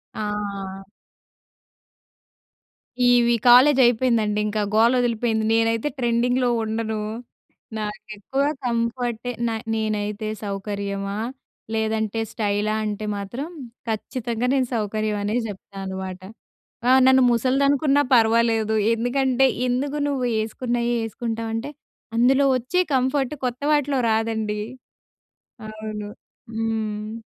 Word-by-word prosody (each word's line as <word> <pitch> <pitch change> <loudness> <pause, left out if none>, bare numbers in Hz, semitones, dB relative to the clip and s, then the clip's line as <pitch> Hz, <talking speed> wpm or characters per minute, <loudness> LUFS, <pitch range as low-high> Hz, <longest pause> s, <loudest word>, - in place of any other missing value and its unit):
ఆ! 200 -2 -4 2.2
ఈవి 240 -1 +5
కాలేజయిపోయిందండి, 240 -4 +5
ఇంకా 210 0 -1
గోలొదిలిపోయింది. 230 -1 +2
నేనైతే 225 +3 +2
ట్రెండింగ్‌లో 245 +1 +1
ఉండను. 220 0 -2 0.8
నాకెక్కువ 215 +4 -3 0.2
కంఫర్టే 235 0 -1 0.2
న - - 0 0.2
నేనైతే 215 -1 -2 0.2
సౌకర్యమా, 200 0 -3 0.6
లేదంటే 220 0 -1
స్టైలా 210 0 0
అంటే 210 0 -3
మాత్రం, 235 +10 -5 0.4
ఖచ్చితంగా 235 +2 -2
నేను 265 -2 +2
సౌకర్యం 215 -1 -1
అనే 210 +3 -1
చెప్తా‌నమాట. 190 -1 -7 0.7
ఆ! - - +6 0.2
నన్ను 260 0 +6
ముసలదనుకున్నా 275 +4 +3
పర్వాలేదు. 225 -1 +3 0.2
ఎందుకంటే, 260 +2 +2 0.2
ఎందుకు 275 +4 -1
నువ్వు 265 -3 -1
యేసుకున్నయ్యే 240 +2 -1
యేసుకుంటావంటే, 225 +2 -4 0.5
అందులో 260 +4 +4
ఒచ్చే 255 +9 +1
కంఫర్ట్ 265 +2 +1
కొత్త 245 +3 -4
వాటిలో 285 -2 +2
రాదండి. 220 -1 -1 1.1
అవును. 215 -1 -6 0.5
హ్మ్. 220 -1 -2
225 Hz, 85 wpm, -23 LUFS, 215-245 Hz, 2.2 s, ఆ